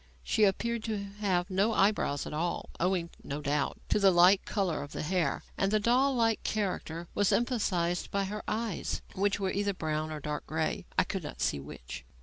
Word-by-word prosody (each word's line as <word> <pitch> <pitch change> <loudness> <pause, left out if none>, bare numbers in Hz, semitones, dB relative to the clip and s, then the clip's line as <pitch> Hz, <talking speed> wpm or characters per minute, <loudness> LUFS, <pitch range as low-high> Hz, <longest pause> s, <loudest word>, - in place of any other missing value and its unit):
She 215 - +3
appeared 230 +3 0
to 220 -2 -1 0.2
have 185 -2 0
no 200 +4 +2
eyebrows 195 -8 +2
at - - -6
all 170 +3 -2
owing, 175 -1 0
no 140 +2 -4
doubt, 145 0 -1
to - - +3
the 200 -1 +6
light 180 +2 +6
colour 190 -8 0
of 145 0 -8
the - - -3
hair 165 -3 0 0.2
and 195 0 +2
the 215 - +3
doll 255 +5 +3
like 225 -2 +2
character 175 -5 -2
was 205 -1 +2
emphasized 185 -8 +1
by 200 0 0
her 210 +2 -4
eyes, 220 -3 -2
which 200 +1 +1
were 190 -1 0
either 200 0 0
brown 155 -2 -2
or 155 - -4
dark 150 +1 -4
grey, 160 0 -2
I - - +6
could - - -4
not - - -8
see 70 - +1
which. 65 -3 -8
190 Hz, 195 wpm, -30 LUFS, 160-210 Hz, 0.2 s, the